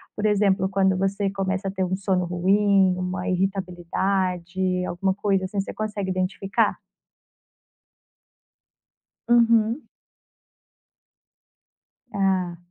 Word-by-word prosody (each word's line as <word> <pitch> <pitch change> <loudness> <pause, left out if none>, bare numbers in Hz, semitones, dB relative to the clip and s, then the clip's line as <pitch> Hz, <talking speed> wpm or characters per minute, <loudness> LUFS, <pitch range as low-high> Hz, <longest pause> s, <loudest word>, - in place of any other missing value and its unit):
Por 210 - -3
exemplo, 200 -2 +2
quando 190 -1 +2
você 195 +1 0
começa 195 0 -2
a 190 - -1
ter 190 -1 -2
um 185 +1 -1
sono 190 -2 0
ruim, 190 +1 +3
uma 180 0 -3
irritabilidade, 185 0 -1
alguma 190 +2 -1
coisa 195 -1 0
assim, 195 +1 -3
você 195 - -3
consegue 210 -3 -3
identificar? 185 +1 0 2.5
Uhum. 230 0 +4 2.3
Ah. 190 -3 0
190 Hz, 95 wpm, -24 LUFS, 185-200 Hz, 2.5 s, Uhum